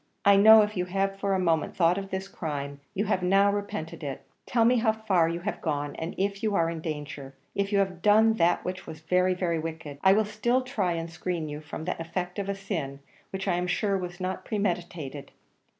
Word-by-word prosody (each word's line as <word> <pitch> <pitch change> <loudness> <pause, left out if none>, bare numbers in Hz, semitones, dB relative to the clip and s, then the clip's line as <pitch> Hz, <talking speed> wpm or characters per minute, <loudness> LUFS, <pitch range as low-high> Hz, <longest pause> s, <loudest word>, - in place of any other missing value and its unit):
I 200 0 +7
know, 215 +2 +9
if 210 +1 -3
you 180 -1 0
have 195 +1 -1
for 195 -1 +1
a - - +1
moment 165 -3 +1
thought 175 +1 +3
of 195 0 -7
this 190 0 -4
crime, 145 -6 -5 0.2
you 205 +2 0
have 195 -2 0
now 195 +2 +4
repented 205 -6 -4
it: 140 -2 -5 0.2
tell 230 -2 +3
me 245 +2 +5
how 225 -1 +3
far 195 -7 +2
you 170 +1 -3
have 205 +4 -4
gone, 145 -2 -2
and 160 +2 -5
if 200 +1 -1
you 215 -3 0
are 165 -2 +2
in 165 -1 -5
danger; 145 -3 -6 0.2
if 200 0 -1
you 200 - +2
have 190 -3 0
done 220 +3 +5
that 170 -1 +2
which 185 +1 -5
was 160 0 -8
very, 180 +2 +2
very 170 -3 -1
wicked. 160 -3 -6
I 190 - +7
will 215 +1 +3
still 235 +5 0
try 210 -9 -1
and 165 0 -3
screen 170 -1 -3
you 150 +1 -6
from 155 +1 -7
the 180 -2 -3
effects 180 +3 -4
of 200 0 -3
a 200 - -1
sin, 160 -9 -4 0.3
which 190 +1 -5
I 175 -2 +2
am 180 0 -1
sure 200 +2 +1
was 180 -1 -4
not 185 0 -3
premeditated. 170 - -3
185 Hz, 230 wpm, -27 LUFS, 165-200 Hz, 0.3 s, know